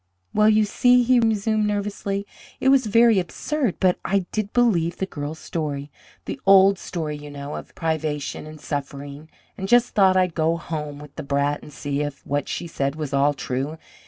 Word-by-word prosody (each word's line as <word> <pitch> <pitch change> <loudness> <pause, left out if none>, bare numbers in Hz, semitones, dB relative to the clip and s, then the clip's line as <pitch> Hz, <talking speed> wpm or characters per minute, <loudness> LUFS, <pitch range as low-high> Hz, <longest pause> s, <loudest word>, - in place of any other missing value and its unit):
"Well, 215 0 +5
you 215 0 +4
see," 245 +4 +4
he 250 +1 +4
resumed 220 -1 +1
nervously, 200 -1 -2 0.3
"it 265 - +3
was 265 -4 +4
very 230 -1 +5
absurd, 245 - -2
but 185 -2 +2
I 195 -1 0
did 215 -1 -2
believe 180 -9 +2
the 190 - -1
girl's 150 -3 -6
story 150 -3 -4 0.3
the 270 - -6
old 195 0 +6
story, 155 -4 -4
you 145 0 -10
know, 145 0 -7
of - - -9
privation 155 -3 -2
and 155 0 -10
suffering, 145 +1 -6 0.3
and 190 - -3
just 240 +3 +4
thought 190 -2 +5
I'd 180 -2 +2
go 165 +1 +1
home 150 -3 -5
with 145 -1 -12
the - - -3
brat 140 0 0
and - - -12
see 145 0 -3
if 145 -2 -5
what 145 0 -2
she 175 - -3
said 140 -4 -2
was 150 -3 -5
all 140 +1 +3
true. 135 +4 -3
165 Hz, 190 wpm, -23 LUFS, 145-205 Hz, 0.3 s, old